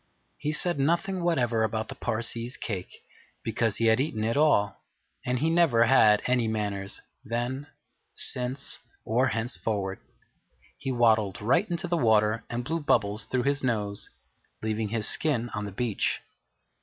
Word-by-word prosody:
He 150 - -1
said 165 0 +2
nothing 175 +5 +1
whatever 120 -10 +1
about 110 0 -1
the - - -5
Parsee's 115 +3 -3
cake, 95 -6 -4 0.5
because 110 -3 0
he 115 - +1
had 110 +1 +4
eaten 135 -6 -1
it 115 +1 0
all; 145 -9 +2 0.5
and 125 0 +1
he 150 +6 0
never 165 -9 +4
had 110 -4 +5
any 125 -2 +2
manners, 100 -3 -1 0.2
then, 120 +5 -3 0.5
since, 125 +2 -1 0.3
or 125 +4 +2
henceforward. 110 -5 -2 0.8
He 135 - -3
waddled 110 -5 +3
straight 135 - +1
into 175 +1 -2
the 175 0 0
water 110 -3 +3
and 120 +1 -3
blew 160 +6 -2
bubbles 110 -7 +1
through 125 -1 -1
his 140 +1 0
nose, 105 -5 -1 0.5
leaving 110 -1 -1
his 110 -1 +1
skin 125 -7 +2
on 105 -2 -3
the 100 - -6
beach. 110 +1 -1
115 Hz, 150 wpm, -27 LUFS, 110-135 Hz, 0.8 s, had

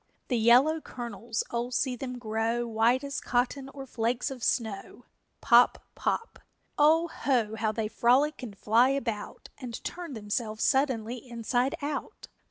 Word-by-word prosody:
_ - - -41 0.3
The 245 - +1
yellow 255 +8 +5
kernels, 230 -3 -5
oh, 240 +1 -2
see 255 +1 0
them 250 0 -6
grow 225 +1 -1
White 235 +3 +2
as 280 0 -4
cotton 260 +2 -1
or 275 -1 -9
flakes 245 +1 -1
of 255 -3 -8
snow! 220 +1 -2 0.4
Pop! 240 +1 +5 0.2
Pop! 460 - -2 0.4
O 320 +3 +4
ho, 240 -9 0
how 220 0 0
they 215 0 -2
frolic 260 +8 +2
and 215 -6 -8
fly 230 +6 +4
about 230 -7 -4
And 240 -3 -7
turn 345 -4 -6
themselves 215 +1 -3
suddenly 255 -4 +1
inside 245 +2 0
out! 285 -1 -5
245 Hz, 150 wpm, -28 LUFS, 225-270 Hz, 0.4 s, yellow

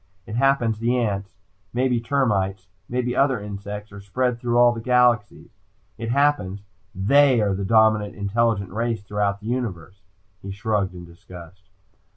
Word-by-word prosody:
It 105 - -8
happens 120 -3 +2
the 120 +2 +1
ants, 100 -5 -2 0.4
maybe 125 0 +1
termites, 100 -7 0 0.2
maybe 125 0 -1
other 135 -4 +2
insects, 105 +1 -7
are 100 0 -10
spread 125 +4 -1
through 120 0 0
all 120 0 +6
the 115 -1 -5
galaxies. 120 -3 +1 0.4
It 115 0 -5
happens 115 -8 +1 0.3
they 130 +6 +4
are 105 -2 +1
the 95 +1 -3
dominant 110 -1 +3
intelligent 100 -1 0
race 115 0 -2
throughout 105 0 -1
the - - -13
universe." 100 -6 -4 0.4
He 100 - -8
shrugged 100 -2 -2
in 90 -1 -9
disgust. 90 +2 -14
110 Hz, 150 wpm, -23 LUFS, 100-120 Hz, 0.4 s, all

